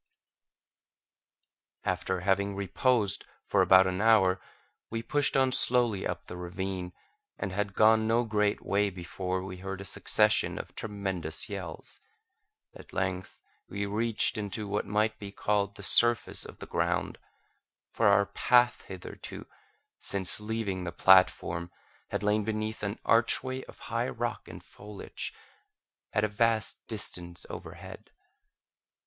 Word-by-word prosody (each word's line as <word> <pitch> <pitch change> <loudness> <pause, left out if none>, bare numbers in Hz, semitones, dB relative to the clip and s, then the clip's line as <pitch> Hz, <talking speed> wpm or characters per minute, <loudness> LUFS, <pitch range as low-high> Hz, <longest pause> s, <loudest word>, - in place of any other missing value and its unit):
After 95 -1 -1
having 100 +1 +1
reposed 100 +2 +1 0.2
for - - +2
about 95 0 +7
an 95 +1 -1
hour, 95 -5 +4 0.5
we 115 0 -4
pushed 145 0 +1
on 130 -1 +3
slowly 120 -6 +4
up 90 0 -5
the - - -8
ravine, 90 0 -4 0.5
and 95 - -3
had 100 +1 -2
gone 110 0 +5
no 115 +2 +3
great 105 -2 0
way 100 +1 +2
before 95 0 -4
we 95 -1 -7
heard 95 +1 -6
a 100 - -7
succession - - +2
of - - -7
tremendous 95 -7 -3
yells. 95 -6 -7 0.7
At - - -14
length 95 -1 -3 0.3
we 100 +1 -3
reached 110 +2 +1 0.2
what 105 -1 -3
might 110 +1 0
be 100 -2 -7
called 100 -1 0
the 100 - -9
surface 120 +5 +3
of - - -11
the - - -8
ground; - - -1 0.7
for 115 - +2
our 100 0 +5
path 120 +3 +3
hitherto, 95 -2 -8 0.5
since 95 -1 +2
leaving 105 -4 -3
the 90 - -4
platform, 90 -3 +4 0.4
had - - -3
lain 105 +1 +2
beneath 110 +1 -3
an 100 +1 -3
archway 130 +3 +2
of - - -14 0.2
high - - 0
rock - - -4
and - - -10
foliage, 105 0 -7 0.8
at 105 - +1
a - - +3
vast 110 0 0
distance 85 -2 -3
overhead. - - -10
100 Hz, 130 wpm, -29 LUFS, 95-110 Hz, 0.8 s, about